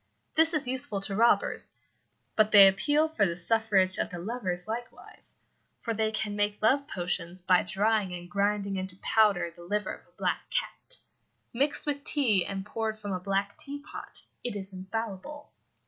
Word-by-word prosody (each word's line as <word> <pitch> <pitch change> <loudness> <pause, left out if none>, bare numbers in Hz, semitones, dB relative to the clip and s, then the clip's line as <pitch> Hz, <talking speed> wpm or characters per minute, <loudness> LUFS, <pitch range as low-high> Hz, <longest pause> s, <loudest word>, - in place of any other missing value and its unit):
This 320 +1 +5
is 285 -4 +1
useful 250 -5 0
to 195 0 -3
robbers, 230 +3 +2 0.6
but 215 -1 +4
they 200 -2 +10
appeal 290 +11 +3
for 315 -10 0
the 170 -3 +1
suffrage 190 0 +3
of - - 0
the 175 - -7
lovers 185 -2 -4
likewise, 235 +2 -7 0.4
for 230 - -3
they 220 0 0
can 215 -1 -2
make 205 0 0
love 275 +6 +2
potions 180 - -3
by 180 -1 +4
drying 210 0 +1
and 175 0 -8
grinding 200 +1 0
into 185 0 -4
powder 195 -6 +3
the 175 - -14
liver 210 +4 -2
of - - -13
a - - -32
black - - -2
cat. - - -2 0.6
Mixed 280 +5 0
with 285 -1 -2
tea, 230 - +2
and 195 0 -5
poured 220 0 -3
from 205 -2 -6
a 185 - -2
black 195 +1 -2
teapot, 285 +1 -7 0.2
it 245 -3 -2
is 195 -1 -7
infallible. 225 +9 -6
210 Hz, 170 wpm, -28 LUFS, 190-235 Hz, 0.6 s, they